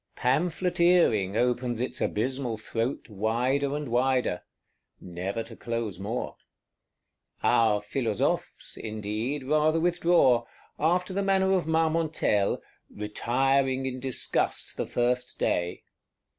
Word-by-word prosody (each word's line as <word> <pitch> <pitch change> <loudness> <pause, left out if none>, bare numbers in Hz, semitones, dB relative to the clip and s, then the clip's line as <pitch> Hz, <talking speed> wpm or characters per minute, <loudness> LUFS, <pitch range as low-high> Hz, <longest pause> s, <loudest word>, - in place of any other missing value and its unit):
Pamphleteering 170 - +2
opens 125 -1 0
its 125 - -3
abysmal 125 +1 -1
throat 115 +4 -3
wider 125 +7 0
and 150 -1 -4
wider: 125 -5 +1 0.6
never 95 +5 -4
to 115 0 -12
close 115 -6 -4
more. 110 +5 -4 1.1
Our 105 -3 +3
Philosophes, 110 -1 -2
indeed, 110 +6 -3
rather 155 +3 +2
withdraw; 165 -8 +3 0.3
after 180 +4 +1
the 200 - 0
manner 190 -1 +2
of 180 -4 +1
Marmontel, 160 -10 +1 0.3
"retiring 130 +5 0
in 130 -1 -3
disgust 130 -1 -1
the - - -3
first 125 +1 -1
day." 85 0 -1
125 Hz, 105 wpm, -27 LUFS, 110-155 Hz, 1.1 s, Our